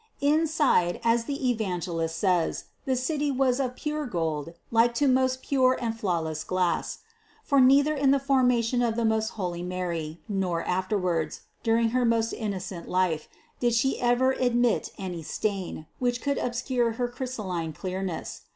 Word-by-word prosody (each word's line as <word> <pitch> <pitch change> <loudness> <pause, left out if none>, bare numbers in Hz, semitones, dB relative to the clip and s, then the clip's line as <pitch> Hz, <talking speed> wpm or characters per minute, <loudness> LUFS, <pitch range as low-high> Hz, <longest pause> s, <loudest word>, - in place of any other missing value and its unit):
Inside, 295 - +2
as 230 0 +2
the 275 -2 0
Evangelist 175 -7 -2
says, 180 -4 +1 0.2
the 265 - +1
city 290 +3 -1
was 260 -1 +2
of 255 -2 -1
"pure 300 0 -3
gold, 165 -5 -2 0.2
like 230 +1 +4
to 285 +3 +2
most 260 0 +2
pure 260 -2 +3
and 230 -2 -2
flawless 165 -7 -2
glass," 180 +1 -1 0.4
for 280 -2 +3
neither 280 +4 +5
in 280 -2 +2
the 280 - +5
formation 250 -3 +2
of 235 -2 +1
the 235 0 0
most 220 0 +1
holy 175 -3 -3
Mary, 175 -3 -3
nor 185 -5 -1
afterwards, 180 -4 -1 0.2
during 230 0 +2
her 250 +2 +1
most 230 -1 +2
innocent 190 -5 -5
life, 180 -4 0 0.3
did 240 -1 +2
She 265 +4 +1
ever 245 +2 +3
admit 245 -3 +1
any 180 -4 -5
stain, 190 -1 -3
which 245 -1 0
could 280 +1 -1
obscure 240 -1 0
her 245 +2 -1
crystalline 220 -9 -4
THE 160 - -6
CONCEPTION 185 +4 -5
231 190 +1 -3
clearness. 165 -3 -6
230 Hz, 160 wpm, -27 LUFS, 180-255 Hz, 0.4 s, neither